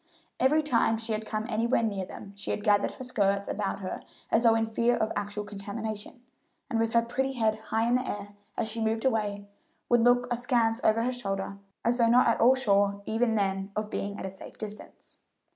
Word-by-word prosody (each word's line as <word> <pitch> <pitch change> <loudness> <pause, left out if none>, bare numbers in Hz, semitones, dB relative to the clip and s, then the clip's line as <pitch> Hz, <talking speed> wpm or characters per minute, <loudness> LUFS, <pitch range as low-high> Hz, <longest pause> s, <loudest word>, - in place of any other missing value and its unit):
Every 300 +4 +4
time 230 -5 +2
she 225 0 -3
had 215 0 -3
come 215 0 -2
anywhere 230 +1 +1
near 200 -4 -1
them 200 - -10
she 200 - -7
had 210 - -2
gathered 205 -1 +3
her 260 - -8
skirts 200 -5 0
about 200 -1 -2
her 185 - -4 0.3
as 225 - +4
though 230 -1 +5
in 225 0 +2
fear 235 +2 +1
of 220 - 0
actual 205 +1 -3
contamination, 210 +3 -6 0.5
and 225 - +1
with 225 0 0
her 235 0 +4
pretty 265 +3 -1
head 220 -4 +2 0.2
high 225 +1 +1
in 240 - +2
the 255 - -3
air, 205 0 -5 0.3
as - - 0
she 225 +1 -2
moved 225 +2 0
away, 205 -5 0 0.4
would 240 -1 +5
look 245 +1 +4
askance 240 -1 +1
over 220 +1 +3
her 250 - +1
shoulder 195 -4 -3 0.3
as 240 +2 +2
though 230 -1 +5
not 250 +2 +6
at 230 - +2
all 255 +3 +7
sure 200 -5 +2
even 225 +1 +1
then 195 -1 0
of 215 0 -3
being 200 0 -3
at - - -5
a 190 - -4
safe 190 - -12
distance. 210 -1 -10
225 Hz, 210 wpm, -28 LUFS, 205-235 Hz, 0.5 s, all